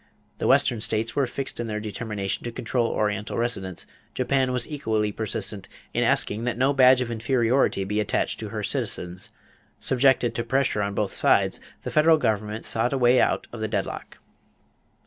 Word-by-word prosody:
The - - 0
Western 115 -3 +3
states 110 +1 -1
were 140 -2 +2
fixed 135 +1 -4
in 120 - -2
their 105 -1 -3
determination 105 -2 -4
to 120 - -3
control 115 +1 -1
Oriental 105 -1 -2
residents; 95 -7 -2 0.3
Japan 130 0 +1
was 125 -1 -1
equally 110 -8 -1
persistent 105 -2 -2 0.3
in - - +1
asking 105 +3 +1
that 125 -1 -1
no 135 +3 +2
badge 130 -1 +6
of 120 -1 -3
inferiority 115 -1 +1
be 105 +2 -2
attached 105 - -1
to - - -5
her - - -4
citizens. 90 +1 -2 0.5
Subjected 130 -2 +3
to 115 - -2
pressure 130 -3 +1
on 100 0 -2
both 100 -2 -1
sides, - - +2 0.2
the - - -4
federal 160 +1 +5
government 110 -4 -1
sought 120 +4 +1
a - - +1
way 125 0 +4
out - - +1
of 120 - -7
the 110 - -1
deadlock. - - -4
115 Hz, 175 wpm, -25 LUFS, 105-130 Hz, 0.5 s, badge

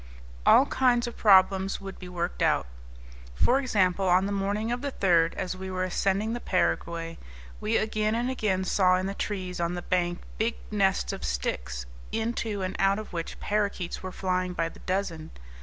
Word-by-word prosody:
All 265 - +8
kinds 250 -4 +2
of 240 - -6
problems 195 -1 +4
would 195 -1 -8
be 180 - -8
worked 175 0 -3
out. - - +3 0.7
For 255 - +3
example, 195 -7 +1
on 180 +2 +4
the 200 - -2
morning 205 +3 -1
of 245 +1 -2
the 280 0 -3
3rd, 170 -3 +3
as 185 -1 -3
we 190 0 -6
were 185 0 -2
ascending 195 +4 0
the 240 - -3
Paraguay, 165 - -1 0.4
we 220 +2 +1
again 215 0 0
and 240 +2 0
again 210 -7 0
saw 185 0 +3
in 185 +1 -1
the 195 - -2
trees 185 -3 -4
on 170 +1 -1
the 175 - -5
bank 175 -1 0 0.2
big 230 +1 +1 0.2
nests 195 -2 +1
of - - -7
sticks, - - -3 0.3
into 220 -3 -2
and 185 0 -3
out 195 +1 +3
of 215 -3 -7
which 165 -1 -5
parakeets 205 -4 -1
were 185 - -5
flying 185 -1 -1
by 165 -1 -1
the - - -15
dozen. 180 -4 -3
190 Hz, 185 wpm, -27 LUFS, 180-215 Hz, 0.7 s, All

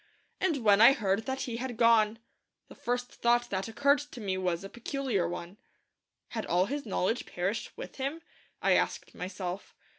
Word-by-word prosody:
And 325 -10 0
when 205 -1 +6
I 240 +4 +9
heard 205 -4 0
that 265 0 -2
he 235 -2 -3
had 245 -1 -4
gone, 230 -2 +4 0.5
the - - -11
first 245 +1 -2
thought 240 0 +2
that 190 +1 -1
occurred 280 +6 +3
to 290 -3 -9
me 195 -4 -1
was 180 -1 -1
a - - -5
peculiar 240 -5 -2
one. 175 +3 -7 0.7
Had 220 -2 -4
all 180 +2 +3
his 280 +2 -4
knowledge 205 +4 0
perished 190 +5 -3
with - - -8
him? 280 +5 -3 0.4
I - - +4
asked - - 0
myself. 185 +1 -5
225 Hz, 175 wpm, -30 LUFS, 190-260 Hz, 0.7 s, I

